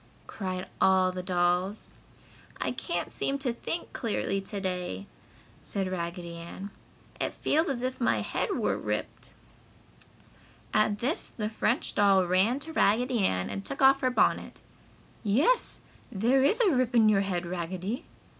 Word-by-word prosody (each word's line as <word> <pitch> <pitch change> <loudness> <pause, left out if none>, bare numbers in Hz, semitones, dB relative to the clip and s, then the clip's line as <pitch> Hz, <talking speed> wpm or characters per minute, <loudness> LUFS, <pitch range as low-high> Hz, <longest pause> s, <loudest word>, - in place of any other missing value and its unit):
cried 185 -2 -4
all 190 0 +4
the 180 0 -4
dolls. 180 +2 0 0.7
"I - - -1
can't - - -3
seem 275 - -1
to 265 -3 -2
think 330 +8 -4
clearly 200 -3 -1
to 200 +1 -5
day," 180 - -3 0.6
said 195 -2 -3
Raggedy 170 -1 -4
Ann. 185 +4 -8 0.5
"It - - -1
feels 320 +4 +1
as 250 -3 -2
if 255 0 -3
my 235 - +2
head - - -1
were - - 0
ripped." - - -4 1.4
At 215 -1 +3
this 255 +10 -1
the 210 -2 -3
French 230 +3 0
doll 195 -2 +4
ran 190 +8 +3
to 320 +2 -7
Raggedy 245 0 +2
Ann 95 - 0
and 100 0 -4
took 95 - -3
off 270 +1 +6
her 255 - +3
bonnet. 250 - +1 0.6
"Yes, 275 - +2 0.3
there 245 +6 +3
is 295 - +4
a 410 -6 +5
rip 250 -1 +1
in 225 -2 +6
your 205 -2 +4
head, 185 -3 -2
Raggedy!" 185 - -4
200 Hz, 150 wpm, -28 LUFS, 185-250 Hz, 1.4 s, off